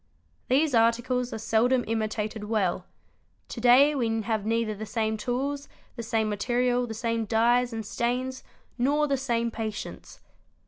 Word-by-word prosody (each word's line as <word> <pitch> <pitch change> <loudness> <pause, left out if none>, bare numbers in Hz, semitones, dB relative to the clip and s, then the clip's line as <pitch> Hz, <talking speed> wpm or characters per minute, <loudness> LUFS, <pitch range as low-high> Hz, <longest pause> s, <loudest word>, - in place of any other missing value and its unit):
These 285 +3 +3
articles 240 +2 +2
are - - -4
seldom 235 +3 +2
imitated 215 -1 -2
well; 195 -4 -1 0.6
to 235 - -6
day 255 +5 +6
we 225 -5 0
have 215 -1 -2
neither 225 -1 0
the 210 +1 -7
same 220 -1 -1
tools, 270 +6 -3 0.3
the 235 - -5
same 225 -1 0
material, 245 +3 0
the 225 - -6
same 230 0 -1
dyes 240 +3 +2
and 225 -1 -5
stains, 250 +4 -2 0.4
nor 290 +4 +2
the 280 -2 +1
same 235 -3 -1
patience. 220 -2 -6
230 Hz, 145 wpm, -27 LUFS, 220-250 Hz, 0.6 s, day